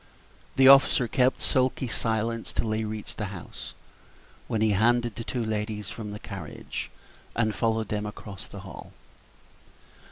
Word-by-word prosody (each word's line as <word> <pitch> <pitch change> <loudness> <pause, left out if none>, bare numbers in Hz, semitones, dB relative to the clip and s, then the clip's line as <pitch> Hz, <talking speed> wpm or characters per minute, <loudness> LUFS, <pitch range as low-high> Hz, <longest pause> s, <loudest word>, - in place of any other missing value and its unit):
The 135 0 +7
officer 135 -2 +7
kept 130 +2 +2
sulky 130 0 +1
silence 115 0 0
till 110 - -1
they 110 +1 0
reached 105 -1 -6
the 105 - -2
house, 95 -5 -8 0.7
when 110 - -1
he 110 -1 +4
handed 120 +2 +3
the 115 - -5
two 120 0 -2
ladies 105 -2 -2
from 110 -2 -6
the 105 - -5
carriage, - - -6 0.5
and 110 -2 +2
followed 110 -2 0
them 105 0 -1
across 100 -2 -9
the - - -9
hall. - - -10
110 Hz, 150 wpm, -27 LUFS, 105-120 Hz, 0.7 s, The